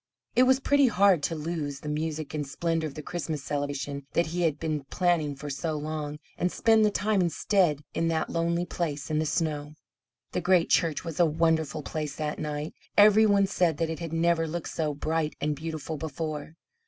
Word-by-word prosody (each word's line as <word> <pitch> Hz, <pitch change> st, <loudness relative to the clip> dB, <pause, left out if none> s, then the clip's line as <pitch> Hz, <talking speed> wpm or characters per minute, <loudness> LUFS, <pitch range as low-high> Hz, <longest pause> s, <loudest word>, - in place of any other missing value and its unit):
It 255 Hz, +1 st, +5 dB
was 260 Hz, 0 st, +5 dB
pretty 280 Hz, 0 st, +4 dB
hard 200 Hz, -6 st, +4 dB
to 165 Hz, +3 st, -1 dB
lose 150 Hz, -3 st, -4 dB
the -, -, -8 dB
music 155 Hz, 0 st, -3 dB
and 150 Hz, -2 st, -2 dB
splendour 165 Hz, +2 st, -1 dB
of 140 Hz, -, -9 dB
the 155 Hz, -, -7 dB
Christmas 160 Hz, -4 st, -4 dB
celebration 140 Hz, -1 st, -3 dB
that 170 Hz, -, +3 dB
he 175 Hz, +2 st, -3 dB
had 160 Hz, -4 st, +2 dB
been 155 Hz, -3 st, -2 dB
planning 165 Hz, -3 st, +1 dB
for 145 Hz, +2 st, -8 dB
so 155 Hz, +3 st, -2 dB
long, 150 Hz, 0 st, -4 dB, 0.2 s
and 180 Hz, +1 st, +1 dB
spend 225 Hz, -1 st, +4 dB
the 210 Hz, -, +5 dB
time 205 Hz, 0 st, +1 dB
instead 170 Hz, -3 st, +1 dB
in 165 Hz, -, 0 dB
that 160 Hz, -1 st, 0 dB
lonely 170 Hz, +1 st, 0 dB
place 155 Hz, -4 st, -3 dB
in 155 Hz, -, +1 dB
the 155 Hz, -, 0 dB
snow. 150 Hz, -2 st, -2 dB, 0.6 s
The -, -, -1 dB
great 180 Hz, -2 st, +3 dB
church 165 Hz, -2 st, +2 dB
was 165 Hz, -1 st, -5 dB
a 170 Hz, -, +6 dB
wonderful 160 Hz, -1 st, +1 dB
place 150 Hz, -2 st, -4 dB
that 150 Hz, -1 st, -3 dB
night. 150 Hz, 0 st, -4 dB, 0.2 s
Every 215 Hz, +1 st, +7 dB
one 200 Hz, -1 st, +4 dB
said 175 Hz, -5 st, +1 dB
that 165 Hz, 0 st, -1 dB
it 160 Hz, -, -5 dB
had 165 Hz, -2 st, -5 dB
never 165 Hz, 0 st, +2 dB
looked 170 Hz, +1 st, -4 dB
so 155 Hz, -3 st, -2 dB
bright 155 Hz, +1 st, -1 dB
and 150 Hz, 0 st, 0 dB
beautiful 155 Hz, 0 st, -5 dB
before. 155 Hz, 0 st, -5 dB
160 Hz, 200 wpm, -28 LUFS, 150-170 Hz, 0.6 s, Every